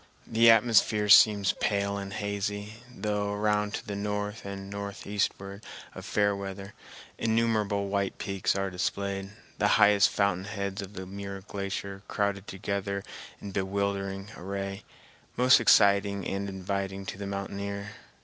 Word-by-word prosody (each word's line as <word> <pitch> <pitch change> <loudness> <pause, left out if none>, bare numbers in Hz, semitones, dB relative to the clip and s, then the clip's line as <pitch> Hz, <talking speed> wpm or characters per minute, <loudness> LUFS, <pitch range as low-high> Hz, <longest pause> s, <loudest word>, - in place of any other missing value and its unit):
The 115 +1 +5
atmosphere 110 -2 +4
seems 100 -1 +7
pale 100 -1 0
and 100 0 -6
hazy, 100 +1 -3
though 105 -2 -2
around 105 0 0
to - - -6
the 100 - -3
north 105 +1 -3
and 100 0 -6
northeastward 100 0 -3 0.3
of - - -9
Fairweather 100 -1 -1 0.5
innumerable 110 -3 +1
white 100 -1 -1
peaks 100 -2 -1
are 95 -1 -1
displayed, 95 +2 -2 0.3
the - - +3
highest 105 0 +6
fountain 100 -2 0
heads 100 -1 -4
of 100 +1 -8
the 95 -1 -6
Muir 100 0 -7
Glacier 100 0 -5
crowded 100 -1 -1
together 100 +1 -3 0.4
in 100 - -7
bewildering 100 +1 -2
array, 100 +1 -5 0.5
most 125 +1 +6
exciting 100 -3 +4
and 100 +1 -2
inviting 95 0 -3
to 95 - -6
the 100 - -4
mountaineer. 100 +1 -4
100 Hz, 130 wpm, -28 LUFS, 100-105 Hz, 0.5 s, seems